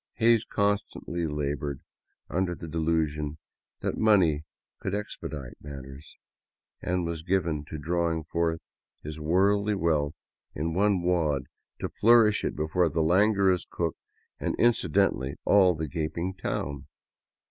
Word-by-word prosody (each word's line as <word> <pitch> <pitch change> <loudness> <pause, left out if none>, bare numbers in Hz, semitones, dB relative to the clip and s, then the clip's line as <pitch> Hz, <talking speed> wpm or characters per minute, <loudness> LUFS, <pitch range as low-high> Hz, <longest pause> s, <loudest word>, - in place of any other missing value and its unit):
Hays 115 -1 +4
constantly 100 -4 -1
labored 75 -2 -3 0.5
under 90 +2 -1
the 85 - -8
delusion 80 -2 -1 0.4
that - - -2
money 90 -9 +4 0.3
could 95 - -2
expedite 75 -10 -6
matters, 70 0 -10 0.6
and 90 -1 -1
was 85 -1 -3
given 85 -4 0
to 75 - -6
drawing 85 +1 0
forth 80 +1 -1 0.4
his 75 +1 -6
worldly 100 +6 +2
wealth 80 -4 +1 0.4
in 80 +3 -2
one 100 0 +2
wad 80 -6 +1 0.4
to - - -1
flourish 115 -2 +5
it - - -1
before 80 +3 +1
the 80 +2 0
languorous 95 +1 +3
cook 85 -3 -2 0.4
and, - - -1
incidentally, 75 - +2
all 95 -3 +5
the 80 0 -3
gaping 85 +5 -3
town. 70 -7 -4
85 Hz, 125 wpm, -28 LUFS, 75-95 Hz, 0.6 s, flourish